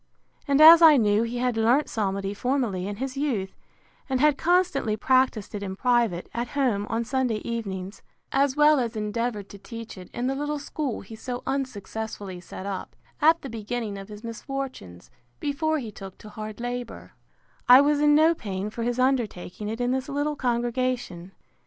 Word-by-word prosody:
And 280 0 +3
as 325 +2 +10
I 315 -3 +8
knew 210 -2 +3
he 235 +1 -2
had 250 -1 0
learnt 235 +6 +3
psalmody 195 -2 -2
formerly, 225 -5 -1
in 205 - -4
his 260 +4 -4
youth, 230 -10 -2 0.5
and 260 -1 0
had 300 +1 +4
constantly 335 -11 +1
practised 255 -4 +1
it 205 - -4
in 190 -1 -4
private, 235 -6 +1
at 240 +1 -2
home, 220 -7 +1
on 230 +1 -1
Sunday 250 -2 0
evenings, 200 -4 -5 0.3
(as 275 0 +2
well 300 -1 +5
as 235 -2 -2
endeavoured 215 0 -2
to 200 - -11
teach 230 -2 -9
it 180 - -11
in 240 - -3
the 265 - +1
little 295 +2 -2
school 285 -2 -4
he 220 +3 -11
so 245 +2 -6
unsuccessfully 220 -7 -4
set 185 - -9
up, 195 -2 -5 0.3
at 325 +2 +4
the - - -5
beginning 225 -1 -4
of 195 +1 -10
his 210 +1 -10
misfortunes, 230 - -7 0.3
before 315 +2 0
he 235 -7 -5
took 195 -2 -10
to 215 - -12
hard 215 0 -7
labour,) 245 0 -5 0.6
I 250 +1 +11
was 290 0 +2
in 295 0 +5
no 315 +2 +5
pain 200 - -5
for 230 - -6
his 240 +1 -1
undertaking 225 -6 -1
it 225 +2 -4
in 245 0 0
this 265 +2 -2
little 290 +1 -1
congregation. 240 -7 -2
240 Hz, 180 wpm, -25 LUFS, 210-270 Hz, 0.6 s, I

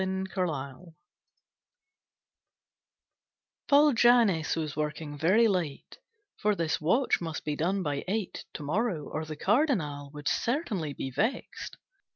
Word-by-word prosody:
_ 190 0 -2
The - - -18
Shadow 160 -2 -3 2.7
Paul 290 0 +6
Jannes 225 -9 +4
was 155 -3 -3
working 150 0 -3
very 185 +10 +4
late, 175 -8 -3 0.4
For 210 0 +1
this 165 -4 -1
watch 230 - +2
must 165 -2 -5
be 150 -1 -1
done 185 +5 0
by 145 -3 -2
eight 205 0 -3
To - - -5
morrow 170 0 -1
or 155 +1 -4
the 155 0 -6
Cardinal 180 - +1
Would 145 0 -6
certainly 215 - -1
be 135 - -5
vexed. 220 - -2
170 Hz, 130 wpm, -29 LUFS, 150-215 Hz, 2.7 s, Paul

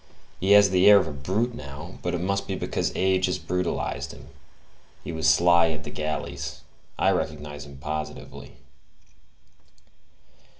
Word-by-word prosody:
He 95 +2 +4
has 100 -2 +7
the 95 +2 +6
air 105 - +9
of 100 - +2
a 80 - -5
brute 95 - -1
now; 75 +2 -9
but 90 0 -2
it 85 - -3
must 100 +2 -1
be - - -2
because - - -2
age 95 0 +2
has 90 - -1
brutalized 90 -1 -2
him; 65 - -13 0.7
he - - -5
was 80 -1 +1
sly 85 +1 +5
at 75 -3 -4
the - - -7
galleys: 70 -2 -4 0.4
I - - +3
recognize 75 -1 -4
him 70 -1 -12
positively." 75 +2 -6
85 Hz, 155 wpm, -25 LUFS, 75-95 Hz, 0.7 s, air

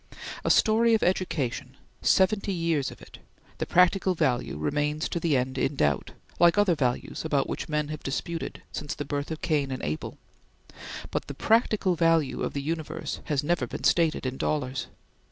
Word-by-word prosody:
A - - 0
story 225 +1 +5
of 220 - 0
education 145 -8 -1 0.2
seventy 200 +1 +3
years 165 -6 0
of - - -13
it - - -13 0.4
the - - -2
practical 185 +1 +3
value 130 - 0
remains 145 - -1
to 170 - -2
the 160 -4 +2
end 130 +1 -2
in 135 - 0
doubt, 75 - 0 0.3
like 175 +2 +5
other 205 -4 +4
values 125 -6 -1
about 145 -4 +1
which - - -4
men 150 -1 -1
have 155 -1 -5
disputed 165 +5 -4
since 145 - -4
the 145 - -5
birth 145 0 -3
of 160 -1 -6
Cain 145 -4 +1
and 130 -1 -5
Abel; 75 +1 -4 0.9
but - - -2
the 140 - -6
practical 215 - +2
value 165 -3 +2
of - - -2
the 140 - -3
universe 160 +1 -4
has 145 -3 0
never 175 +3 0
been - - -7
stated 165 -5 +2
in 130 0 -2
dollars. 135 -3 -2
155 Hz, 175 wpm, -27 LUFS, 135-175 Hz, 0.9 s, story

